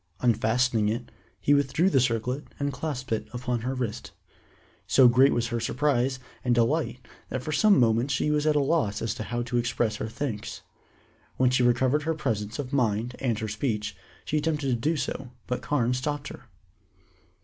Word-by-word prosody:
Unfastening 115 -1 +2
it, 120 +3 -4 0.3
he 145 - +3
withdrew 145 +5 +2
the 145 -8 +4
circlet 125 +3 0
and 140 0 -1
clasped 130 -2 -4
it 110 - -1
upon 125 -1 -1
her 130 +3 -2
wrist. 120 -5 -4 0.7
So 130 - +6
great 130 +3 +5
was 115 -1 0
her 120 -1 -1
surprise 130 +1 +1 0.3
and 125 -1 +2
delight 120 0 0 0.2
that 130 0 -3
for 155 - -3
some 200 +6 +5
moments 120 +3 +3
she 150 +2 +1
was 150 0 +1
at 155 - +3
a - - +4
loss 140 -8 +1 0.2
how 120 +2 -2
to 120 0 -2
express 120 -2 0
her 110 - -4
thanks. 115 -3 -4 0.8
When 130 -1 +3
she 125 - +2
recovered 125 +4 +3
her 160 +2 -1
presence 110 -7 -2
of 140 -1 -5
mind 120 -2 0
and 120 -5 0
her 110 0 -3
speech, 105 -1 -2 0.3
she 155 - 0
attempted 150 -2 -1
to 125 - +2
do 155 +7 0
so, 135 -2 -3 0.2
but 125 - -3
Carne 125 -4 +1
stopped 140 +2 -3
her. - - -11
125 Hz, 180 wpm, -27 LUFS, 115-140 Hz, 0.8 s, So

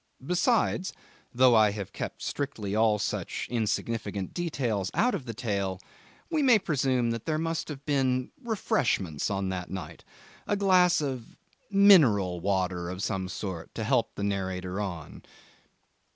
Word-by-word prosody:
Besides 190 - +1 0.4
though 125 0 +5
I 110 -2 +6
have 100 -2 -6
kept - - -6
strictly 110 -8 -3
all 110 -1 +3
such - - -3
insignificant 110 -3 -2
details 120 - -1
out 245 +3 +3
of 155 -10 -3
the 115 - -5
tale 100 -5 -2 0.5
we 315 -2 +2
may 255 -5 +6
presume 130 - 0
that 115 -1 -4
there 155 -1 +1
must 165 0 -2
have 145 -2 -8
been 130 -3 +1
refreshments 110 - 0
on 95 -1 -1
that 90 -1 -4
night, 95 -1 -7 0.4
a 205 - +1
glass 185 -4 +4
of 130 -5 -5 0.3
mineral 140 - +5
water 90 -2 -1
of 90 +1 -5
some 95 -3 -2
sort 95 -5 -6
to - - -3
help - - +1
the 100 - -4
narrator 95 -1 -2
on. 85 -7 -6
115 Hz, 145 wpm, -28 LUFS, 95-155 Hz, 0.5 s, I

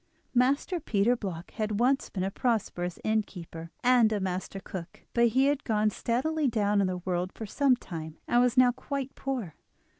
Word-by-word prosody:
Master 275 +8 +2
Peter 230 -3 +2
Bloch 185 -7 -6
had 215 -1 -2
once 265 +3 +2
been 185 - -3
a 195 - -1
prosperous 195 -7 -1
innkeeper, 180 -6 -3
and 245 -3 +5
a 210 - 0
master 190 +1 -3
cook; 185 -3 -8
but 235 0 +4
he 260 +4 +3
had 285 0 +1
gone 215 -2 +1
steadily 285 +8 0
down 210 -3 +2
in 195 - +2
the 185 0 -2
world 180 0 -1
for 220 - -7
some 270 +4 +3
time, 160 -8 -7
and 240 - +4
was 250 0 +2
now 250 -1 +7
quite 270 +2 -4
poor. 250 - -4
220 Hz, 180 wpm, -29 LUFS, 190-255 Hz, -, now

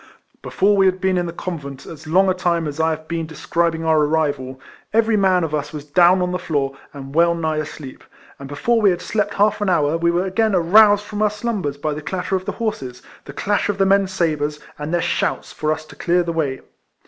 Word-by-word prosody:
Before 205 +2 +1
we 195 -1 +4
had 185 0 +1
been 190 0 +1
in 175 - -2
the - - -4
convent 145 -6 -7
as 160 -1 -11
long 185 +5 +3
a 185 - +3
time 170 -3 0
as 145 +1 -6
I 160 0 +2
have 155 0 -4
been 165 -1 -3
describing 165 +1 -1
our 160 -1 +3
arrival, 145 -4 -1 0.3
every 225 0 +3
man 190 -3 +3
of 155 -2 -3
us 150 -2 -2
was 150 -1 -7
down 175 +4 +4
on 180 - -1
the 180 - -2
floor, 140 -3 -2 0.2
and 135 -1 -9
well 170 +2 +3
nigh 160 -2 -1
asleep; 150 -3 -7 0.4
and 140 - -8
before 225 +11 +1
we 205 - +5
had 175 -2 0
slept 210 -1 -1
half 210 +1 +2
an 205 - +1
hour, 160 -3 +2
we 170 0 +2
were 175 +2 +1
again 205 +2 +1
aroused 205 +4 +5
from 210 0 -5
our 215 - +4
slumbers 205 -9 -3
by 150 +1 -2
the 150 - -6
clatter 185 +4 -3
of 185 0 -3
the - - -3
horses, 135 - -4 0.2
the 140 - -9
clash 205 +7 -1
of 205 - -1
the 195 - +3
men's 195 0 +3
sabres, 150 -4 -1 0.2
and 150 +1 -4
their 175 -1 +1
shouts - - -1
for 155 0 -1
us 155 0 -3
to - - -14
clear 175 +1 +1
the 170 -1 -3
way. 145 -5 -2
170 Hz, 235 wpm, -20 LUFS, 155-190 Hz, 0.4 s, we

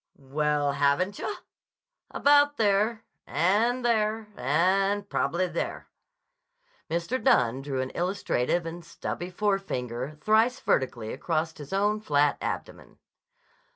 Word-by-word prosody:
"Well, 145 +1 0
haven't 145 +8 +1
yah? 420 - -3 0.7
About 290 0 +4
there—and 215 - +1
there—and 205 - +1
prob'ly 185 -2 0
there." 170 -2 -4 1.0
Mr. 170 +10 -2
Dunne 125 - +3
drew 135 -2 -2
an 130 - -4
illustrative 175 -3 -1
and 170 +1 -6
stubby 175 +2 -5
forefinger 155 - -2
thrice 220 +8 +3
vertically 120 -4 -1
across 160 +2 -2
his 145 -2 -10
own 205 +2 +1
flat 145 -7 +2
abdomen. - - -5
175 Hz, 100 wpm, -27 LUFS, 145-210 Hz, 1.0 s, About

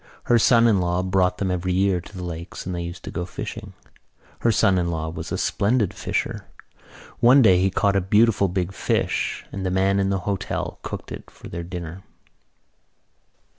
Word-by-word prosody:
Her 120 -1 +3
son 115 +2 +5
in 105 -4 +4
law 90 0 0
brought 90 -1 +1
them 95 -2 -1
every 90 0 -1
year 95 -1 +2
to 95 +3 -12
the 90 - -5
lakes 85 0 -7
and 90 - -3
they 85 - -3
used 85 +1 -7
to - - -7
go 90 - -3
fishing. 90 - -7 0.7
Her 115 - +3
son 95 -2 +3
in 85 -1 0
law 80 -1 -3
was 80 - -7
a - - -1
splendid 105 -1 +1
fisher. - - -3 0.7
One 125 +3 +6
day 90 -4 +5
he 95 - +3
caught 100 +1 +1
a 100 - +3
beautiful 105 +2 +3
big 90 0 -2
fish - - -1
and 95 - -5
the 95 - 0
man 95 +1 +2
in 95 0 +1
the 95 -1 -1
hotel 100 -2 -3
cooked - - -7
it - - -8
for - - -13
their 85 - -5
dinner. 85 0 -7
95 Hz, 195 wpm, -23 LUFS, 90-100 Hz, 0.7 s, One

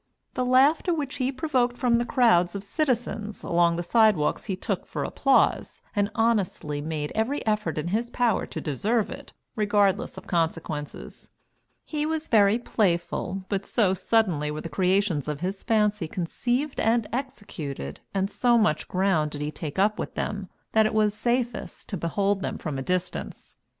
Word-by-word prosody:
The 255 - -1
laughter 275 +8 +4
which 285 -4 -4
he 260 +1 0
provoked 255 -4 0
from 240 -2 +2
the 240 - 0
crowds 190 -9 +4
of 200 - -4
citizens 225 -4 -2
along 170 0 +3
the 175 - -2
sidewalks 210 -5 +3
he 190 - -2
took 185 - -3
for - - -3
applause, 275 -1 +1
and 205 0 +2
honestly 200 -10 0
made 150 -1 -3
every 225 +7 -1
effort 210 -8 0
in 155 +3 -2
his 230 +5 -1
power 240 -3 +1
to - - -5
deserve 205 - 0
it, - - -9 0.2
regardless 205 -3 +1
of - - -9
consequences. 160 -3 -3 0.6
He 300 -1 -2
was 320 0 -2
very 210 -1 +5
playful, 185 -4 -1
but 195 -1 -1
so 200 -5 +2
suddenly 185 -6 +1
were 150 +1 -4
the 165 - -6
creations 185 -2 +1
of 150 0 -3
his 190 +2 -3
fancy 210 -5 +1
conceived 245 - -2
and 230 0 +2
executed, 165 - -5
and 195 +1 -1
so 240 -1 +3
much 155 -9 +1
ground 185 -5 +1
did 145 0 -7
he 150 +1 -2
take 155 -2 -6
up 210 +2 +2
with - - -4
them, 200 -2 -3 0.2
that 220 -1 +4
it 215 - -4
was 210 -1 +3
safest 240 +2 -2
to 200 - -3
behold 195 +4 0
them - - -3
from 150 -5 -4
a - - -3
distance. 180 +5 -3
205 Hz, 170 wpm, -26 LUFS, 170-235 Hz, 0.6 s, very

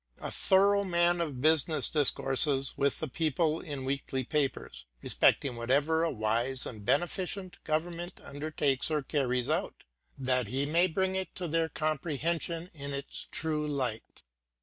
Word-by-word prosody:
A - - -4
thorough 200 +1 +3
man 175 -1 +1
of 145 -7 -4
business 155 +1 +3
discourses 135 -1 +4
with 140 0 0
the 155 - -3
people 155 +2 0
in 145 -5 -6
weekly 135 -1 -2
papers, 130 - -3 0.2
respecting 135 -4 +3
whatever 140 +7 +1
a 170 - +1
wise 120 +3 0
and 110 -4 -8
beneficent 180 - -2
government 170 +3 -3
undertakes 145 -2 -1
or 150 -2 -1
carries 125 -4 -1
out, - - -2 0.3
that 125 -3 0
he 135 +6 -1
may 170 +5 +3
bring 190 +2 -1
it 190 -2 -4
to 180 - -4
their 165 0 0
comprehension 160 +3 -2
in 140 -2 -7
its 140 +1 -4
true 155 -1 -1
light. 130 -6 -4
150 Hz, 145 wpm, -30 LUFS, 135-170 Hz, 0.3 s, discourses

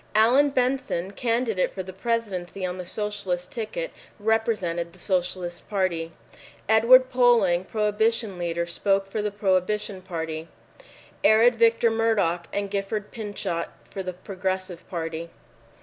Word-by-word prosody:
Allan 250 +7 +5
Benson, 255 -8 0
candidate 230 -2 0
for 190 - -6
the 190 0 -9
Presidency 195 -4 -2
on 180 0 -4
the 180 - -6
Socialist 195 -3 -3
ticket, 375 - -4 0.3
represented 205 -6 0
the - - -16
Socialist 180 -2 -2
Party. 180 -5 -1 0.6
Edward 245 +4 +6
Polling, 230 -8 +4
Prohibition 215 -1 0
leader, 170 0 -1
spoke 195 +3 +1
for 195 +2 -3
the 210 - 0
Prohibition 200 0 0
Party, 165 -3 -5 0.8
arid 225 +3 +6
Victor 230 0 +4
Murdock 205 -7 +1
and 200 -1 -2
Gifford 205 +1 -3
Pinchot 205 -6 -4 0.2
for 195 - -4
The 185 -1 -4
Progressive 185 -1 -4
Party. 165 -1 -4
195 Hz, 125 wpm, -25 LUFS, 180-225 Hz, 0.8 s, Edward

